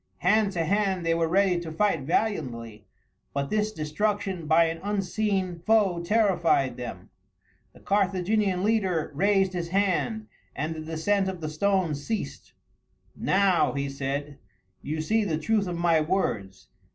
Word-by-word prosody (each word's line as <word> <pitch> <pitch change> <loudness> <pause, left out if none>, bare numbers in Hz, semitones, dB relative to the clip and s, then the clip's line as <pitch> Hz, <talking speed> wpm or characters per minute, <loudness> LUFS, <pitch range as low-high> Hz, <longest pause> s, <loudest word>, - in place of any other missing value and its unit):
Hand 205 +2 +2
to 165 -3 -1
hand 190 -1 0
they 165 - +2
were 165 0 +1
ready 185 0 +2
to 165 -2 -6
fight 180 -1 +1
valiantly, 125 - -2 0.5
but 140 0 -2
this 215 0 +1
destruction 195 +1 -2
by 165 +2 +5
an 165 0 -3
unseen 195 -2 -1
foe 195 -2 +2
terrified 170 - +2
them. 110 -7 -8 0.6
The - - -18
Carthaginian 195 0 +1
leader 190 -8 +1
raised 195 +3 +2
his 175 -2 -3
hand, 200 +3 0 0.3
and 155 +4 -2
the 160 - -7
descent 165 +5 0
of 185 -2 -6
the 155 -2 -4
stones 165 -3 0
ceased. 220 +5 -5 0.6
"Now," 195 -3 +2
he 140 -1 -2
said, 140 +1 -4 0.4
"you 155 +2 -3
see 220 +7 +1
the 165 -6 -1
truth 205 +5 0
of 175 -1 -3
my 170 -2 +3
words. 105 - -2
180 Hz, 145 wpm, -26 LUFS, 155-200 Hz, 0.6 s, by